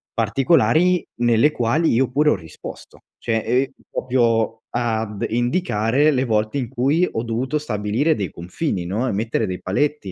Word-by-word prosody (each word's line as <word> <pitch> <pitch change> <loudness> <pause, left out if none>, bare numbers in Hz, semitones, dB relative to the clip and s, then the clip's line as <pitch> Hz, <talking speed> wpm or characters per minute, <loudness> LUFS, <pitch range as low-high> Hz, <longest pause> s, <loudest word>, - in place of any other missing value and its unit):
particolari, 160 +9 +3
nelle 120 +4 +4
quali 150 +6 +1
io 125 +2 +2
pure 150 +3 +3
ho - - +2
risposto. 80 -5 -11 0.2
Cioè, 115 - -1
e 125 +4 +1 0.2
proprio 115 -3 0
ad 110 -3 -2
indicare 120 - +1
le 130 -1 +1
volte 110 +1 0
in 125 -4 -2
cui 140 +8 +1
ho 110 - -2
dovuto 125 +6 -2
stabilire 120 +4 0
dei 100 -3 -3
confini, 90 - -3
no, 110 +8 -1
e - - 0
mettere 110 +2 -1
dei 90 -1 -5
paletti 120 +1 -1
120 Hz, 155 wpm, -21 LUFS, 110-140 Hz, 0.2 s, nelle